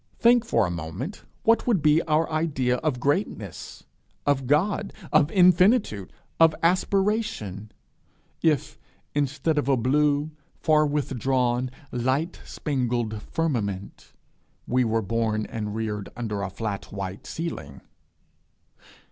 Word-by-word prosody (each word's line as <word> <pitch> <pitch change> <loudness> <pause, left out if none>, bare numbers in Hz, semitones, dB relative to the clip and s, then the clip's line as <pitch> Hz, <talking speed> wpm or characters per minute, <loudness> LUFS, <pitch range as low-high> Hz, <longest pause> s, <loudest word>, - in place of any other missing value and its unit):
Think 240 0 +5
for 115 - +2
a 90 - -2
moment 85 - -6 0.2
what 230 +2 +3
would 200 -11 +2
be 155 +1 +5
our 155 +1 +2
idea 140 -6 +1
of 145 -3 -1
greatness, 140 - -2 0.4
of 135 -3 +1
God, 195 +8 +1 0.2
of 150 -1 +5
infinitude, 180 - +4 0.3
of 165 -1 +6
aspiration, 185 - 0 0.7
if, 155 -5 +1 0.3
instead 145 +2 0
of 140 - -1
a 135 - +4
blue, 145 +4 +2 0.2
far 155 -1 +3
withdrawn, 130 -3 0 0.2
light 130 +8 -1
spangled 120 -6 -2
firmament, 105 - -3 0.5
we 125 +1 +2
were 115 -1 0
born 110 +1 0
and 105 -2 -4
reared 105 -2 -3
under 105 -4 -3
a 100 - -2
flat 100 0 -4
white 95 -1 -6
ceiling! 80 - -5
135 Hz, 115 wpm, -25 LUFS, 110-160 Hz, 0.7 s, of